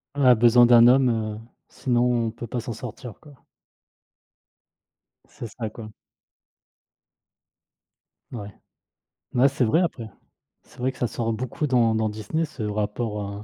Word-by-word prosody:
On 140 - +1
a 125 -1 +7
besoin 120 +1 +5
d'un 120 -1 +7
homme, 130 0 +5
heu, 110 -2 -3 0.3
sinon 120 -2 0
on - - -3
peut 120 - -8
pas 120 +2 -4
s'en 120 0 -5
sortir, 120 +1 -9
quoi. 150 -2 -16 1.9
C'est 120 - -9
ça, 110 +1 -6
quoi. 110 0 -10 2.4
Ouais. 105 -4 -8 0.8
Ouais, 125 +3 +5
c'est 135 -2 -1
vrai 125 +9 +2
après. 120 -10 -3 0.6
C'est - - -22
vrai 130 +2 0
que - - -18
ça 125 - -1
sort 115 0 -3
beaucoup 125 +6 -3
dans 120 -4 +2
dans 110 -1 0
Disney 110 +10 -3
ce 140 -7 -8
rapport 105 +1 -3
heu, 100 +1 -7
120 Hz, 145 wpm, -24 LUFS, 110-125 Hz, 2.4 s, a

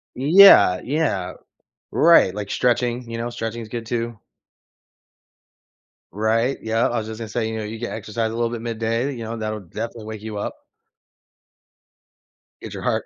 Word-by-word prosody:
Yeah, 145 - +7
yeah. 125 - -1 0.6
Right, 165 - +5
like 105 -1 -5
stretching, 120 0 0
you 115 - -4
know, 120 +1 -3
stretching 115 0 -5
is 110 - -10
good 115 0 -6
too. 115 -1 -3 1.9
Right, 115 +5 0
yeah, 115 +1 +1
I 120 - -2
was 110 -1 -3
just 110 0 -7
gonna 115 - -5
say, 110 +1 -2
you 110 - -4
know, 110 - -4
you 110 +2 -6
get 120 +1 -5
exercise 110 +1 -3
a - - -6
little 115 0 0
bit 120 -1 -5
midday, 115 +3 -2
you 115 -3 -7
know, 115 +1 -5
that'll 110 -1 -3
definitely 110 +4 -7
wake 110 -1 -7
you 110 -1 -6
up. - - -4 2.1
Get - - -8
your - - -7
heart - - 0
115 Hz, 170 wpm, -22 LUFS, 110-120 Hz, 2.1 s, Yeah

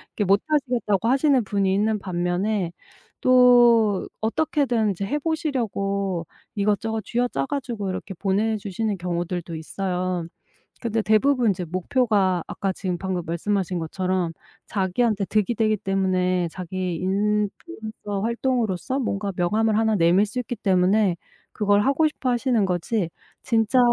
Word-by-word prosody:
이렇게 210 - 0
못 195 +2 +4
하시겠다고 245 -8 +1
하시는 270 -1 +3
분이 195 -1 0
있는 210 +2 +1
반면에 180 +1 -1 0.5
또 240 -5 +5
어떻게든 235 -2 +1
이제 195 +1 -3
해 290 +9 -1
보시려고 200 - -1 0.3
이것저것 210 +2 0
쥐어짜 235 - -1
가지고 235 -8 -3
이렇게 190 +1 -5
보내주시는 205 +1 -1
경우들도 175 -1 -3
있어요. 180 +1 -2 0.6
근데 230 -2 0
대부분 235 +3 +3
이제 180 -2 -4
목표가 190 - +1
아까 195 - -2
지금 185 -1 -3
방금 185 0 -2
말씀하신 180 +2 -1
것처럼 180 +1 -1 0.4
자기한테 200 +2 0
득이 215 +3 +1
되기 215 -1 +2
때문에 185 -2 0
자기 185 0 -4
인플루언서 210 - -2
활동으로서 235 -1 -1
뭔가 200 -5 -2
명함을 215 +5 +1
1 220 -1 +2
내밀 180 +2 +4
수 220 +4 -4
있기 245 0 -4
때문에 190 -1 +2 0.3
그걸 205 -1 +2
하고 280 +5 +3
싶어 275 -4 -3
하시는 240 -2 +2
거지 180 +1 -1 0.3
진짜 230 0 +2
205 Hz, 320 characters per minute, -24 LUFS, 185-230 Hz, 0.6 s, 또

